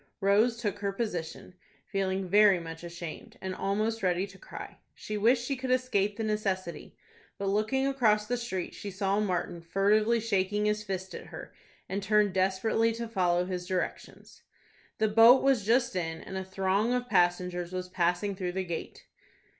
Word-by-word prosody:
Rose 210 +5 +3
took 205 -4 -2
her 200 -1 -1
position, 185 -5 -4 0.3
feeling 190 -1 -1
very 200 0 +5
much 165 0 -8
ashamed, 175 +7 -8
and 190 0 -4
almost 215 +4 -1
ready 180 0 +1
to 195 -1 -15
cry. - - -10 0.2
She 215 - -6
wished 235 +4 +3
she 275 - -1
could 260 0 -5
escape 210 -6 +1
the 225 - -2
necessity; 195 -5 -3 0.4
but 195 0 -2
looking 220 +7 +1
across 225 -6 +2
the 245 +3 -1
street 235 -7 -4
she 205 - -7
saw 195 +1 0
Martin 180 -4 -2
furtively 210 +6 +2
shaking 210 -1 0
his 210 0 0
fist 190 -2 -5
at - - -8
her, - - -10 0.3
and 195 +1 -3
turned 210 -1 +2
desperately 195 +5 +2
to 230 +1 -5
follow 180 -5 +1
his 180 -1 -4
directions. 185 -1 -5 0.6
The 220 -1 +2
boat 225 +4 +7
was 260 -7 +2
just 240 -2 +2
in, 165 -2 -2
and 190 - -8
a 190 - -2
throng 195 +4 0
of 245 0 -2
passengers 175 -2 +1
was 185 0 -4
passing 180 +2 0
through 180 -2 -3
the 190 0 -1
gate. 170 -2 -6
200 Hz, 170 wpm, -29 LUFS, 185-220 Hz, 0.6 s, boat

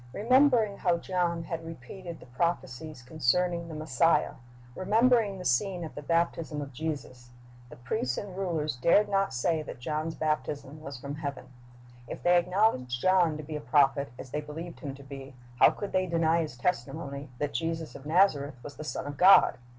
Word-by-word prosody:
"^ - - -19
Remembering 235 - +3
how 175 -2 +2
John 170 -1 -1
had 165 0 -5
repeated 165 +3 -9
the - - -13
prophecies 150 0 -3
concerning 170 +6 0
the 160 - -7
Messiah, 155 +1 +2 0.4
remembering 220 - +3
the 180 - -8
scene 175 +7 +1
at 160 - -7
the 145 - -7
baptism 165 -2 0
of 140 -2 -6
Jesus, 125 -4 -5 0.4
the - - -11
priests 125 0 -2
and 195 -3 -6
rulers 165 -7 -1
dared 170 +11 +4
not 195 -1 +1
say 155 +6 0
that 150 - -8
John's 155 +4 -3
baptism 150 -1 -3
was 140 -4 -7
from 140 +3 -6
heaven. 140 -3 -6 0.6
If - - -7
they 175 0 +5
acknowledged 175 - +1
John 180 -2 +3
to 155 - -7
be 155 +1 -6
a 150 - -4
prophet, 140 -3 +2
as 130 - -9
they 150 - -2
believed 160 +3 -8
him 140 -4 -6
to 140 - -13
be, 135 -1 -10 0.2
how - - +8
could 205 - -5
they 185 0 +1
deny 165 0 +2
his 150 -6 -5
testimony 140 0 -3
that 145 +1 -2
Jesus 165 -1 -3
of 140 - -10
Nazareth 155 -5 +3
was 145 -2 -9
the 155 - -6
Son 155 - -4
of 145 -1 -6
God? 185 -3 +7
155 Hz, 185 wpm, -29 LUFS, 140-180 Hz, 0.6 s, how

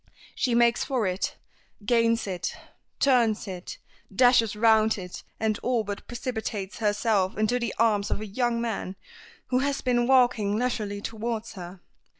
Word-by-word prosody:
She 245 -2 0
makes 235 0 +3
for 255 -6 -1
it, 185 +1 -2 0.5
gains 230 0 +2
it, 185 -3 -3 0.4
turns 235 -6 +2
it, 185 -2 -7 0.3
dashes 230 0 +4
round 220 0 +4
it, 180 -2 -7 0.2
and 220 -1 0
all 245 -2 0
but 205 -1 -6
precipitates 220 -5 -4
herself 205 -3 +1
into 215 +3 +1
the 235 -4 -3
arms 210 -3 +2
of - - -1
a 215 - -5
young 235 +3 -1
man 220 -5 -3 0.5
who 255 - +2
has 280 +1 -1
been 240 -1 +1
walking 245 -6 +3
leisurely 215 -4 -2
towards 225 +1 -4
her. 180 -1 -9
225 Hz, 150 wpm, -26 LUFS, 205-240 Hz, 0.5 s, dashes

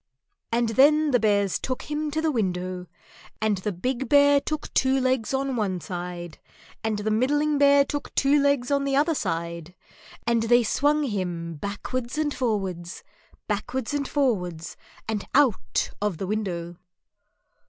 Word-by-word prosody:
And 235 0 +1
then 295 +5 +4
the 245 - +4
Bears 200 -3 +2
took 255 -1 -4
him 300 0 -3
to 315 +2 -2
the 320 - +2
window, 185 -5 -2 0.5
and 215 -3 +1
the 210 +3 -2
big 250 +7 -3
Bear 285 0 +6
took 305 0 -4
two 265 0 +3
legs 255 -4 0
on 270 -1 -1
one 195 -5 -1
side 175 -1 -6 0.4
and 220 -1 0
the 210 +1 -1
middling 290 +6 +1
Bear 280 0 +6
took 290 +1 -5
two 280 +1 +4
legs 280 -2 +1
on 280 0 +2
the 275 -1 0
other 305 +4 +3
side, 170 - -4 0.5
and 235 -1 +2
they 240 +2 +4
swung 295 +6 +2
him 180 -8 -3
backwards 235 - -4
and 300 -2 0
forwards, 190 -7 -3 0.4
backwards 245 +5 -3
and 285 -2 -1
forwards, 180 - -1 0.3
and 215 -2 -3
out 270 -7 +2
of 205 -5 -1
the 195 - -3
window. 180 -4 -3
235 Hz, 155 wpm, -25 LUFS, 190-280 Hz, 0.5 s, Bear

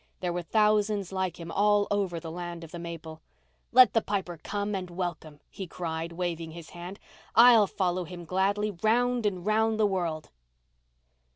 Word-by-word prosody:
There 175 -1 -2
were 175 - -2
thousands 210 0 +1
like 190 -2 -2
him 165 0 -7
all 205 +1 +3
over 195 -4 0
the 165 -1 -7
land 175 0 -6
of 165 - -11
the 175 - -7
maple. 165 -2 -8 0.5
"Let 250 -4 +7
the 225 - +3
Piper 190 -6 -3
come 205 0 -3
and 185 -2 -3
welcome," 170 -4 -5
he 190 - -8
cried, 165 -1 -4
waving 170 -2 -3
his 170 -1 -10
hand. 180 +3 -8 0.4
"I'll 230 -3 +8
follow 185 -1 -1
him 175 0 -9
gladly 200 +4 0
round 230 +4 +1
and 185 -3 -3
round 220 +1 +2
the 215 - +4
world." 170 -6 -2
185 Hz, 170 wpm, -28 LUFS, 170-210 Hz, 0.5 s, I'll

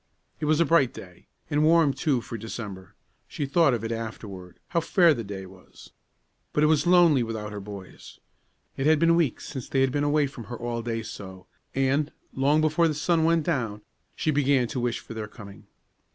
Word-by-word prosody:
It 155 - -2
was 155 +1 +2
a 170 - +4
bright 160 -7 +3
day, 90 -2 -12 0.2
and 145 +1 +2
warm, 160 -3 +4
too, 140 -6 0
for 115 - -8
December; 100 -4 -7 0.3
she 145 - -4
thought 140 -1 +3
of 115 - -5
it 115 - -3
afterward, 105 -5 -7
how 170 - +1
fair 170 0 +4
the 120 -4 -4
day 100 -2 -7
was. 95 0 -16 0.6
But 150 - +2
it - - +6
was 155 +1 +3
lonely 175 -6 +5
without 110 -2 -4
her 105 - -6
boys. 100 -1 -10 0.6
It 135 - 0
had 155 0 +5
been 165 +2 +4
weeks 165 -8 0
since 130 -4 -7
they 135 - +1
had 135 -1 +3
been 145 +1 0
away 145 0 +2
from 130 -4 -8
her 120 +3 -7
all 120 0 -3
day 115 -1 -3
so; 95 -3 -9 0.3
and, 135 +3 +1 0.2
long 145 +3 +2
before 155 +2 +3
the 155 - -1
sun 160 +1 +1
went 165 -1 +3
down, 115 -10 -2 0.3
she 155 - 0
began 140 -3 +2
to 130 - -3
wish 120 -1 -1
for - - -10
their 110 -1 -5
coming. 100 -2 -13
135 Hz, 205 wpm, -26 LUFS, 110-155 Hz, 0.6 s, it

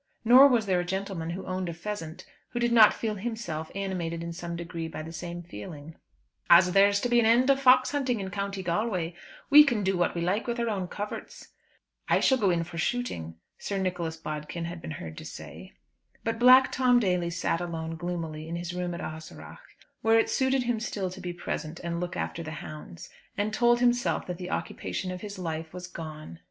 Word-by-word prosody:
Nor 255 +4 +9
was 240 -5 +2
there 185 -2 +2
a - - 0
gentleman 190 -2 -3
who 185 +3 -5
owned 185 -1 -3
a 170 - -5
pheasant 175 -2 -6 0.3
who 240 - -1
did 240 0 +1
not 225 -3 +8
feel 220 -2 -3
himself 210 -7 -4
animated 175 -4 -3
in 170 0 -5
some 170 0 -5
degree 165 -1 -5
by 160 -1 -6
the 160 - -8
same 175 +1 -6
feeling. 150 - -9 0.6
"As 180 +1 +7
there's 200 +1 +5
to - - +1
be 240 0 +4
an 225 - +3
end 250 +4 +5
of 275 0 +1
fox 255 -1 +6
hunting 260 -5 0
in 190 -1 -5
County 200 0 -3
Galway, 180 -1 -1 0.4
we 300 +1 +11
can 240 -8 0
do 190 0 +1
what 175 0 +1
we 170 - -2
like 190 +7 0
with 235 0 -2
our 235 -1 0
own 190 -4 -2
coverts." 205 +3 -7 0.6
"I - - +4
shall 265 -1 +3
go 200 -4 +3
in 170 -2 +1
for 165 0 -7
shooting," 160 - -2 0.2
Sir 200 - -3
Nicholas 180 -4 -2
Bodkin 155 +2 -5
had 170 0 -6
been - - -7
heard 80 -1 -8
to - - -9
say. - - -10 0.5
But 225 0 -2
Black 255 +2 +7
Tom 250 -2 +4
Daly 180 -5 +1
sat 170 0 -1
alone 165 -2 -4
gloomily 165 -2 -5
in 170 - -3
his 175 +1 -4
room 180 -1 -3
at - - -6
Ahaseragh, 160 - -8 0.4
where 225 0 +4
it 225 - +2
suited 265 0 +2
him 240 -2 0
still 200 -4 -3
to 190 +1 -9
be 180 -1 -4
present 170 -1 -5
and 170 0 -2
look 175 0 -4
after 170 - -3
the 160 - -6
hounds, 150 - -9 0.3
and 210 +1 -1
told 240 +1 +4
himself 245 0 +2
that 180 -1 -5
the 180 0 -5
occupation 185 - -3
of 180 - -6
his 205 -2 -7
life 160 -2 -4
was 180 0 -7
gone. 155 - -8
180 Hz, 215 wpm, -28 LUFS, 170-225 Hz, 0.6 s, we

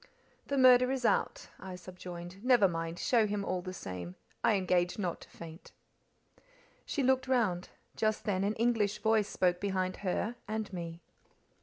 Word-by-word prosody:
"The 280 - -1
murder 255 -1 +7
is 260 -2 -2
out," - - +1
I 190 -1 -7
subjoined. 180 +1 -9
"Never 245 -6 +5
mind, 165 -1 -4
show 230 0 +3
him 205 -1 -2
all 185 -1 -1
the 185 - -6
same; 90 - -7 0.3
I 220 - +4
engage 180 -2 +1
not 180 -5 -3
to - - -13
faint." 165 0 -11 1.1
She 285 - -1
looked 260 0 +2
round. 215 -9 +1 0.3
Just 215 -1 0
then 195 -2 0
an 205 +2 0
English 220 -3 +1
voice 220 -2 +2
spoke 180 -1 +1
behind 185 -2 -1
her 210 +5 -2
and 215 -1 -3
me. 170 -1 -6
195 Hz, 160 wpm, -32 LUFS, 180-225 Hz, 1.1 s, murder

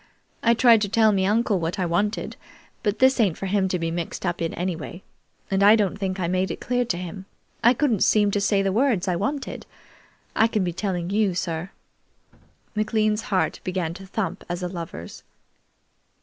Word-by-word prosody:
"I 235 0 +4
tried 230 -2 +6
to 205 - 0
tell 220 0 +4
me 190 -2 +1
uncle 215 -2 +2
what 165 +4 -2
I 185 - 0
wanted, 205 +6 -1 0.5
but 205 -1 0
this 260 0 +4
ain't 195 -8 +2
for - - -5
him 195 0 +1
to 185 - -1
be 165 -1 -2
mixed 170 +2 -4
up 175 -1 -2
in, 165 - -1
anyway, 175 0 -4 0.5
and 195 0 +1
I 205 +2 +8
don't 205 -4 +1
think 190 -1 -3
I 175 - 0
made 185 +2 0
it - - -5
clear 245 0 0
to 185 -7 -2
him. 185 +2 -7 0.4
I 240 +2 +6
couldn't 240 -6 +1
seem 210 -1 +4
to 205 - 0
say 200 -1 +2
the 195 - +1
words 220 -4 +1
I 180 - +1
wanted. 270 +10 -3 0.7
I 225 - +5
can 215 -3 0
be 175 -1 -2
telling 180 -1 -2
you, 205 -3 +1
sir." 170 0 -3 1.0
McLean's 215 0 +1
heart 190 -3 0
began 180 -3 -2
to 190 +2 -11
thump 205 +2 -3
as 175 +1 -3
a - - 0
lover's. 165 - -7
195 Hz, 195 wpm, -24 LUFS, 180-215 Hz, 1.0 s, I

